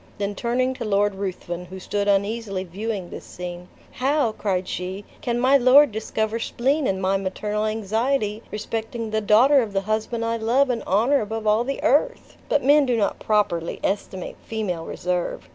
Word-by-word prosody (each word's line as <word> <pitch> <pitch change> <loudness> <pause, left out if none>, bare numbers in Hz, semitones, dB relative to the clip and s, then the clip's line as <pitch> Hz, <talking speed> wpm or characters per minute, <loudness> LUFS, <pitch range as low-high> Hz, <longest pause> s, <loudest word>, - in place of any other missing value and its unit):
Then 205 0 -2
turning 250 +4 0
to 255 - -6
Lord 205 -1 +2
Ruthven, 180 -2 -5
who 190 +2 -9
stood 205 +2 -2
uneasily 200 -1 0
viewing 195 0 -5
this - - -8
scene, 180 0 -8 0.2
"How," 270 -1 +1
cried 190 -4 -2
she, 185 +3 -5 0.2
"can 240 -1 -1
my 260 +3 +5
lord 265 +2 +6
discover 220 +1 -2
spleen 270 +5 0
in 190 -1 0
my 190 +1 +1
maternal 210 +2 -2
anxiety 220 +1 -1
respecting 225 +1 -4
the 220 0 0
daughter 250 +7 +5
of 215 -4 -4
the 195 - +1
husband 220 +3 -2
I 230 0 0
love 250 +4 +2
and 235 - -2
honor 235 +9 +3
above 220 +1 -4
all 215 +2 +3
the 275 +2 -4
earth? 480 - +1
But 290 - +2
men 285 +1 +5
do 245 -2 +2
not 205 - 0
properly 200 -6 0
estimate 190 -2 -3
female 190 -7 -3
reserve. 180 0 -3
215 Hz, 175 wpm, -23 LUFS, 195-240 Hz, 0.2 s, lord